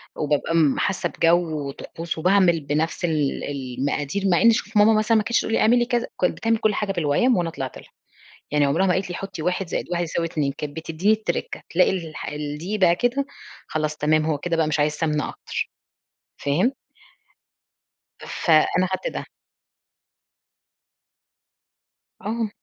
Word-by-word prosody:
وبابقى 150 +2 0
م 150 -5 +3
حاسة 190 - 0
بجو 165 -4 +1
وطقوس 165 +4 -6
وباعمل 180 -1 +4
بنفس 155 +5 -1
ال 150 -4 0
المقادير، 140 +6 -3
مع 175 -3 +3
إن 230 - +7
شوف 215 -1 -1
ماما 215 +2 +6
مثلًا 215 +1 +3
ما 215 - +2
كانتش 235 +2 +1
تقول 225 - -3
لي - - +3
اعملي 240 +2 +4
كذا، 240 0 0
كانت 180 - +1
بتعمل 225 0 +1
كُلّ 215 -1 +1
حاجة 205 -2 -1
بالويّم 175 - +2
وأنا 170 -1 0
طلعت 135 -5 -6
لها، - - -14 0.6
يعني 150 -1 +3
عمرها 165 +8 +2
ما 180 - +3
قالت 190 -1 -1
لي 175 - -4
حطي 195 -4 -6
1 180 +2 -1
زائد - - -2
1 175 0 0
يساوي 165 0 -2
2 145 -4 -1
كانت 150 0 -6
بتديني 165 +6 0
التركة، 215 -6 -3
تلاقي 180 +3 +3
الح 165 -5 -5
الدقيق 150 +7 -4
بقى 175 -2 +5
كده 250 +5 0 0.4
خلاص 155 -1 -2
تمام، 155 +1 +2
هو 155 -2 0
كده 165 +2 -2
بقى 160 -2 +2
مش 155 0 0
عايز 150 +1 +2
سمنة 150 -2 -1
أكتر، - - -5 0.7
فاهم؟ 165 - +2 1.5
فأنا 170 +3 +2
خدت - - -2
ده. - - -4 3.0
آه. 220 +1 -2
170 Hz, 160 wpm, -23 LUFS, 150-200 Hz, 3.0 s, إن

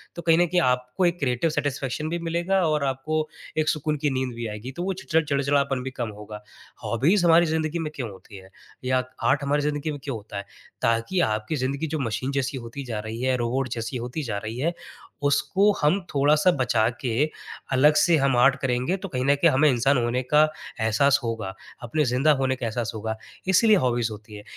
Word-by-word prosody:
तो 170 - -6
कहीं 165 -1 +4
न 175 - +4
कहीं 175 +1 +2
आपको 125 +8 -1
एक 175 0 +1
क्रिएटिव 130 +3 +1
सैटिस्फैक्शन 145 0 -2
भी 170 - -2
मिलेगा 175 +3 +1
और 150 -2 +1
आपको 155 +4 -1 0.3
एक 155 0 +2
सुकून 155 -1 -1
की 145 - +4
नींद 130 -1 -3
भी 120 -1 -4
आएगी 105 +4 -6
तो 175 - -2
वो 190 +1 -1
चि - - -23
चिड़चिड़ापन 140 -2 0
भी 135 - -5
कम 120 -3 -4
होगा। 105 0 -9 0.4
हॉबीज 170 - +2
हमारी 170 +1 +6
ज़िंदगी 160 +1 -1
में 155 -2 -3
क्यों 125 -5 -4
होती 95 +1 -14
है? 95 0 -14 0.4
या 130 0 +2 0.2
आर्ट 135 +4 +3
हमारी 145 +1 +1
ज़िन्दगी 150 +1 -2
में 145 - -6
क्यों 135 -4 -3
होता 105 -1 -9
है? 100 - -5 0.4
ताकि 115 +11 +1
आपकी 110 +3 -1
ज़िन्दगी 140 +3 -2
जो 155 0 -3
मशीन 130 +2 -2
जैसी 135 -1 -2
होती 120 +3 -7
जा 110 -3 -4
रही 110 +2 -6
है, 130 0 +2
रोबोट 125 +2 -1
जैसी 115 +2 -4
होती 125 +6 -4
जा 110 -5 -3
रही 110 +3 -5
है 170 +5 0 0.5
उसको 195 +8 +3
हम 150 +7 +3
थोड़ा-सा 150 +5 +4
बचा 115 -3 +2
के 125 +2 +1 0.5
अलग 145 +4 +5
से 170 +2 +4
हम 135 -3 +2
आर्ट 135 +2 +5
करेंगे 130 +6 0
तो 195 - -6
कहीं 130 -6 -2
न 140 - +5
कहीं 165 +4 +4
हमें 150 +3 +4
इंसान 130 +2 +2
होने 120 +1 0
का 150 +4 +3 0.4
एहसास 120 +6 +3
होगा, 115 -4 -3 0.3
अपने 135 +6 0
ज़िंदा 135 +5 +3
होने 130 -1 +1
का 125 - -5
एहसास 115 0 -2
होगा 110 0 -3 0.3
इसीलिए 215 +3 +5
हॉबीज 120 -5 +1
होती 105 0 -10
हैं, 105 - -9
135 Hz, 210 wpm, -25 LUFS, 120-155 Hz, 0.5 s, हमारी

